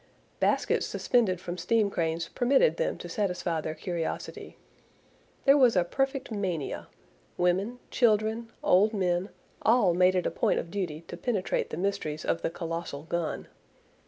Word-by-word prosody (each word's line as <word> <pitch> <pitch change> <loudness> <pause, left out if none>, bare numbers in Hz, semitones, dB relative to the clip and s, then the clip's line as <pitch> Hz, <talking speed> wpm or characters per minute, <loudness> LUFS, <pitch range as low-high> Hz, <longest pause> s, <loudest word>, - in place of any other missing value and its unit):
Baskets - - +1
suspended 220 -8 +1
from 180 0 -6
steam 220 -3 +2
cranes 165 -1 -1
permitted 275 - +3
them - - -1
to - - -8
satisfy 180 -6 -1
their 155 +1 -4
curiosity. 170 -3 -5 0.9
There 275 0 +7
was 245 -5 +5
a 180 - +4
perfect 270 +8 -2
mania. 185 -8 -3 0.5
Women, 185 +7 +1
children, 225 0 +2
old 210 +4 +4
men, 180 0 0 0.3
all 220 -6 +4
made 180 +1 +4
it 180 - +1
a - - 0
point - - +1
of 170 - -4
duty 175 -6 -3
to - - -9
penetrate 215 -7 -1
the - - -5
mysteries 180 -5 -2
of 165 - 0
the - - 0
colossal 165 -3 -5
gun. 170 0 -3
185 Hz, 150 wpm, -28 LUFS, 170-225 Hz, 0.9 s, There